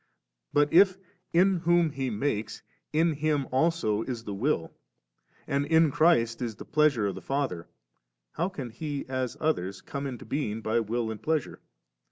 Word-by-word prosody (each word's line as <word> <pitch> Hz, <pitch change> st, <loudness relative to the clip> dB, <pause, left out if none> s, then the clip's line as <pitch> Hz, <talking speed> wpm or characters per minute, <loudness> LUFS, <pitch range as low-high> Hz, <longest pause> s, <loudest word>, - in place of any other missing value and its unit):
* -, -, -57 dB
But 145 Hz, 0 st, +3 dB
i^ 190 Hz, +2 st, +6 dB, 0.3 s
in 185 Hz, +2 st, +4 dB
whom 170 Hz, -1 st, +3 dB
He 135 Hz, -2 st, -2 dB
makes, 110 Hz, -2 st, -2 dB, 0.3 s
in 160 Hz, +1 st, +2 dB
Him 150 Hz, -1 st, 0 dB
also 130 Hz, -7 st, +1 dB
is 120 Hz, -1 st, -4 dB
the 105 Hz, -, -5 dB
will, 100 Hz, -, -1 dB, 0.7 s
and 140 Hz, +1 st, 0 dB
in 160 Hz, 0 st, +4 dB
Christ 130 Hz, -8 st, +3 dB
is 115 Hz, -3 st, -3 dB
the -, -, -10 dB
pleasure 150 Hz, -7 st, +2 dB
of 100 Hz, -, -1 dB
the -, -, -8 dB
Father, 135 Hz, -12 st, -2 dB, 0.6 s
how 175 Hz, +4 st, -1 dB
can 135 Hz, -10 st, -6 dB
He, 145 Hz, +3 st, -4 dB
as 130 Hz, -2 st, -3 dB
others, 95 Hz, -, -1 dB
come 140 Hz, +6 st, -5 dB
into 125 Hz, -3 st, -7 dB
being 115 Hz, -7 st, -2 dB
by 110 Hz, +1 st, +1 dB
will 115 Hz, +1 st, -2 dB
and 110 Hz, -, -7 dB
pleasure? 155 Hz, -3 st, -1 dB
140 Hz, 170 wpm, -28 LUFS, 115-155 Hz, 0.7 s, i^